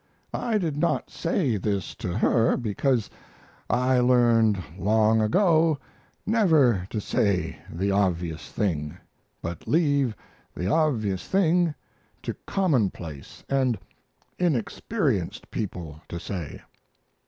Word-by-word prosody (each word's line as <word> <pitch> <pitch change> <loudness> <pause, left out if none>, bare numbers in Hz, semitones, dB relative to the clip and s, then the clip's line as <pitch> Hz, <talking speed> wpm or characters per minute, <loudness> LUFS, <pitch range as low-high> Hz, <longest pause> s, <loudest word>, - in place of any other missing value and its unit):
I 230 -3 0
did 165 -7 -2
not 170 +3 0
say 155 - 0
this 100 0 -2
to 90 -1 -3
her, 115 -1 +3
because 120 +1 0 0.6
I 125 +1 +3
learned 120 -4 +4 0.2
long 110 +3 +3
ago 160 - +3 0.5
never 155 - +3
to 110 - -2
say 100 -2 0
the 95 +4 -1
obvious 90 -5 -1
thing, 75 -8 -2 0.5
but 85 0 -6
leave 145 -7 +2 0.4
the 90 - -3
obvious 110 - +1
thing 175 -4 +2 0.5
to - - -3
commonplace 105 - -1
and 130 -4 +1 0.6
inexperienced 155 - -1
people 85 -7 -5
to 85 - -5
say. 85 -4 -6
115 Hz, 105 wpm, -26 LUFS, 95-150 Hz, 0.6 s, learned